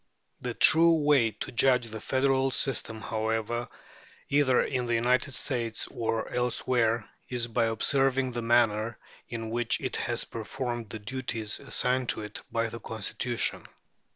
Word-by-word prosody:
The 125 -2 -4
true 165 +1 +6
way 145 -6 +4
to 105 - -7
judge 125 0 +3
the 110 0 -7
federal 135 +1 +2
system, 120 -4 -1
however, 110 +2 -2 0.6
either 140 -3 +4
in 125 -2 -2
the 120 - +1
United 125 +4 +1
States 115 -4 -2
or 115 -1 -2
elsewhere, 120 -2 +1 0.2
is 125 -2 -1
by 115 0 +1
observing 135 +3 +2
the 120 0 -3
manner 115 -1 +2 0.3
in 115 -1 -5
which 120 0 +1
it - - -3
has - - 0
performed 120 0 -5
the - - -5
duties 115 -1 -2
assigned 125 0 0
to 110 - 0
it 105 - -7
by 115 0 0
the 115 - -7
Constitution. 115 +2 -3
120 Hz, 145 wpm, -28 LUFS, 115-130 Hz, 0.6 s, true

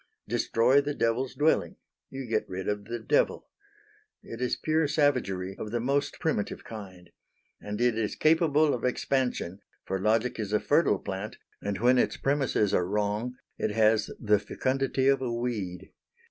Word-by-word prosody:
Destroy 125 +5 +3
the 145 0 -3
devil's 120 +3 0
dwelling. 155 +2 +2 0.3
You 135 0 -6
get 110 -2 -1
rid 95 0 -5
of 105 -1 -2
the 120 +2 -4
devil. - - +1 0.8
It 115 - -8
is 125 - +1
pure 155 -1 +1
savagery 125 -11 0
of 105 - -5
the 120 +2 -1
most 140 +4 -1
primitive 155 -10 -2
kind. 95 -5 -10 0.5
And 105 +1 -5
it 120 -1 +3
is 110 -1 -1
capable 155 -2 +3
of 120 - -4
expansion, 125 -7 -1 0.3
for 95 0 -2
logic 110 +4 +1
is 105 -1 -3
a 105 - +4
fertile 145 -6 +3
plant, 95 +4 -6 0.2
and 100 -1 -2
when 125 +4 +4
its - - +1
premises 135 -7 +1
are 90 - +2
wrong 105 +4 -1 0.2
it - - 0
has 110 0 +3
the 105 -2 +3
fecundity 130 +4 -1
of 135 -1 +4
a 125 -2 -2
weed. 105 -7 -4
115 Hz, 160 wpm, -28 LUFS, 105-135 Hz, 0.8 s, a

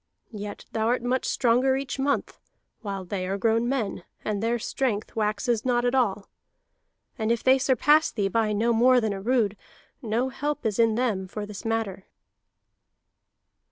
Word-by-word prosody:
Yet 205 -1 -7
thou 220 0 0
art 240 0 +1
much 250 +1 0
stronger 255 +2 +2
each 270 -1 -4
month, 280 +1 -1 0.4
while 195 -4 -5
they 185 0 -3
are 195 +1 -1
grown 225 +3 +1
men, 230 -9 -2 0.2
and 205 -2 -1
their 230 +2 +1
strength 225 -2 -2
waxes 215 +1 0
not 245 -1 +1
at 245 - +1
all. 210 -6 +1 0.9
And 220 +1 +1
if 235 - 0
they 265 +1 +5
surpass 285 +4 +3
thee 205 -3 0
by 215 +2 +1
no 225 +3 +1
more 250 +2 +5
than 220 -3 -1
a 195 - -6
rood, 225 -2 +1 0.5
no 235 +2 0
help 290 +1 -3
is 215 -1 -1
in 225 -1 +4
them 215 -6 0
for 205 +2 -5
this 205 -1 -9
matter." 225 -4 -2
230 Hz, 165 wpm, -26 LUFS, 210-255 Hz, 0.9 s, they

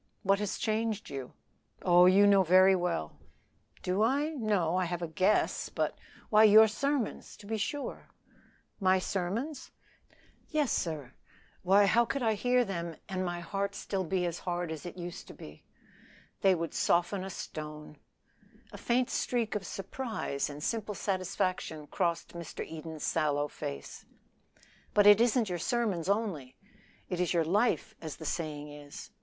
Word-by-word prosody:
"What 195 +1 +3
has 210 -2 -2
changed 220 -2 -1
you?" 135 -2 -6 0.5
"Oh, 180 0 +6
you 195 +2 +6
know 200 -1 +6
very 185 +2 +6
well." 175 - -2 0.6
"Do 185 +3 0
I? 275 +7 +2
No; 210 - 0
I 185 0 +1
have 175 0 -3
a - - -2
guess; 185 +6 +1
but - - -1 0.2
" - - -24
"Why 215 0 +7
your 220 +1 +8
sermons, 275 +2 -2
to 205 - -14
be 220 +2 -2
sure." 285 +7 -4 0.7
"My 190 -1 +4
sermons?" 205 - -3 0.8
"Yes, 300 -4 +1
sir. 150 -6 -2 0.5
Why, 195 +3 +5
how 235 +4 +4
could 250 +3 -2
I 220 -1 +3
hear 245 +3 +2
them 170 -4 -4
and 185 -1 -2
my 175 -1 -3
heart 200 +3 -3 0.3
be 185 0 0
as 170 -1 -3
hard 175 -2 -3
as 160 +2 -6
it 175 - -9
used? 175 -1 -7 1.1
They 190 -1 +5
would 165 -1 -4
soften 175 +3 +1
a 190 - -5
stone." 150 -3 -7 0.7
A - - -9
faint 250 +1 +1
streak 235 -3 -1
of 200 -3 -3
surprise 195 - -3
and 145 +1 -8
simple 215 -3 -2
satisfaction 185 -5 -2
crossed 170 +1 -1
Mr. 170 -2 -6
Eden's 160 -1 -7
sallow 145 -2 +1
face. 70 - -7 0.9
"But 205 -1 +5
it 205 +1 +8
isn't 240 -1 +3
your 175 -1 -2
sermons 205 -6 -1
only 195 - -1 0.5
it 180 -3 -3
is 180 0 +1
your 165 -2 +3
life, 215 +5 +1
as 155 -3 -6
the 160 - -10
saying 150 -2 -3
is. 145 -1 -10
185 Hz, 155 wpm, -30 LUFS, 170-215 Hz, 1.1 s, your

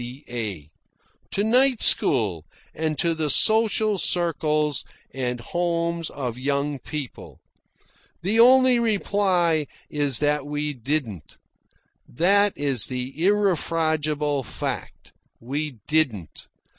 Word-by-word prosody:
C.A., 120 - -6 0.6
to 200 - -1
night 250 +2 +3
school, 100 - +2 0.3
and 155 -1 -2
to 170 +4 +1
the 160 -2 -2
social 215 - +2
circles 155 -5 +1 0.3
and 125 -2 -2
homes 170 +3 -2
of 125 -3 -5
young 140 +1 -1
people. 145 0 -7 0.8
The 210 +5 +1
only 255 +1 +6
reply 190 -8 +1 0.2
is 145 -4 0
that 150 -1 0
we 150 0 -2
didn't. 120 - -4 0.7
That 200 +8 +3
is 140 -6 0
the 130 +1 -4
irrefragable 160 -7 +1
fact. 120 - -6 0.3
We 140 +2 -4
didn't. 125 - -1
150 Hz, 100 wpm, -24 LUFS, 130-175 Hz, 0.8 s, only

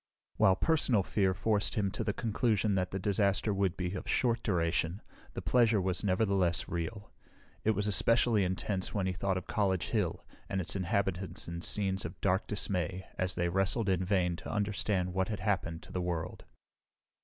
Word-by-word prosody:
While 95 - +5
personal 130 - +2
fear 95 -1 +1
forced 105 +1 +1
him 100 -4 0
to - - -3
the - - 0
conclusion 110 -1 0
that 95 -1 0
the 95 - -3
disaster 100 +1 +1
would 95 -2 0
be 90 0 -2
of 95 - -5
short 120 -2 +2
duration, 85 -1 0 0.3
the - - -5
pleasure 115 -4 +4
was 95 0 -1
nevertheless 95 -3 +1
real. 100 +5 -4 0.5
It 110 0 +2
was 105 - -1
especially 110 +1 +3
intense 95 +1 -1
when 100 -2 0
he 95 - 0
thought 95 +1 -1
of 90 - -5
College 95 -5 0
Hill 105 -7 -1 0.2
and 95 - -1
its 85 -2 -2
inhabitants 95 -3 -1
in 85 0 -5
scenes 95 0 0
of 85 - -7
dark 95 0 +1
dismay 95 -2 -2
as 95 0 0
they 85 - +1
wrestled 95 +4 +1
in 95 -1 +1
vain 90 -2 +1
to - - -7
understand 100 -3 0
what 95 0 0
had 105 -4 -4
happened 90 -5 -1
to - - -12
the 90 - -2
world. 85 -2 -3
95 Hz, 180 wpm, -32 LUFS, 90-105 Hz, 0.5 s, While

